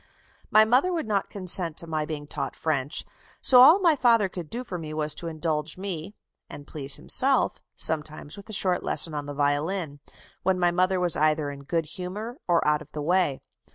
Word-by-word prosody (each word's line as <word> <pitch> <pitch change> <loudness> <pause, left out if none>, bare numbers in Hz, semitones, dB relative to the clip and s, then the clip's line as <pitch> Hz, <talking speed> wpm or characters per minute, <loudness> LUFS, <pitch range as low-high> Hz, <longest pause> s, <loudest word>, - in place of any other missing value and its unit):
"My 215 +1 +6
mother 255 +11 +3
would 335 -6 -2
not 200 -3 -1
consent 180 -4 0
to - - 0
my 155 -2 -3
being 150 -2 -6
taught 145 -1 -5
French,... 145 -3 -1 0.3
so 250 -2 +7
all 310 +8 +8
my 345 -5 +3
father 230 -6 +3
could 175 -4 -8
do 245 +2 -5
for 185 -7 -6
me 155 -1 -7
was 155 -1 +1
to 170 - -7
indulge 155 -1 -3
me 190 0 -6 0.3
(and 145 - -10
please 140 -2 -1
himself) - - +2
sometimes 155 -1 -1
with 200 +2 -13
a - - -7
short 185 -3 +1
lesson 165 - 0
on 145 -1 -4
the 145 - -6
violin, 145 +2 -1 0.4
when 190 0 +1
my 175 -1 +3
mother 185 +1 +1
was 175 -2 +1
either 155 -1 +1
in 140 0 -11
good 165 +2 -1
humour 190 - -7
or 170 -3 +2
out 150 0 +2
of 150 0 -14
the 150 - -5
way.... 175 -4 +1
165 Hz, 200 wpm, -25 LUFS, 150-195 Hz, 0.4 s, all